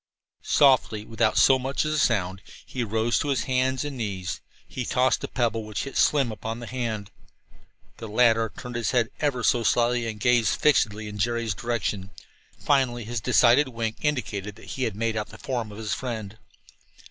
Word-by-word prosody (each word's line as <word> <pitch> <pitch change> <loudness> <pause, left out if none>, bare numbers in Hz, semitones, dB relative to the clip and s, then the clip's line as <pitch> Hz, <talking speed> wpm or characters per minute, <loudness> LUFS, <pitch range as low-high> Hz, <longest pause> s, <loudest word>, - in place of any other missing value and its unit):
Softly, 130 -6 +3
without 115 0 0
so 135 -1 +6
much 135 +3 -1
as 155 - -1
a 155 - +1
sound, 95 -8 +1 0.2
he 125 - -3
rose 110 +2 0
to - - -2
his 135 -4 0
hands 130 +1 0
and 145 -2 -5
knees. 95 -5 -4 0.3
He 130 - -4
tossed 125 +2 +1
a - - -2
pebble, 115 -2 -1
which 105 -1 -4
hit 135 - -8
Slim 140 -6 +3
upon 110 +1 -5
the 120 - -7
hand. 115 -4 -4 0.9
The 115 - -7
latter 115 0 +3
turned 125 - -7
his 120 -1 -1
head 120 -1 +1
ever 135 -5 0
so 120 - +3
slightly 120 0 +2
and 110 -2 -5
gazed 120 -1 +2
fixedly 110 -8 +2
in 105 0 -7
Jerry's 115 0 0
direction. 105 -3 -3 0.5
Finally 130 -4 +1
his 115 +1 -4
decided 125 +6 +4
wink 115 -3 -3
indicated 105 -9 -2
that 110 - -14
he 130 - -1
had 110 -4 -3
made 115 +1 -1
out 105 -1 -2
the - - -12
form 120 -5 -3
of 105 - -10
his 110 -3 -3
friend. 110 -5 -5
115 Hz, 185 wpm, -25 LUFS, 110-130 Hz, 0.9 s, so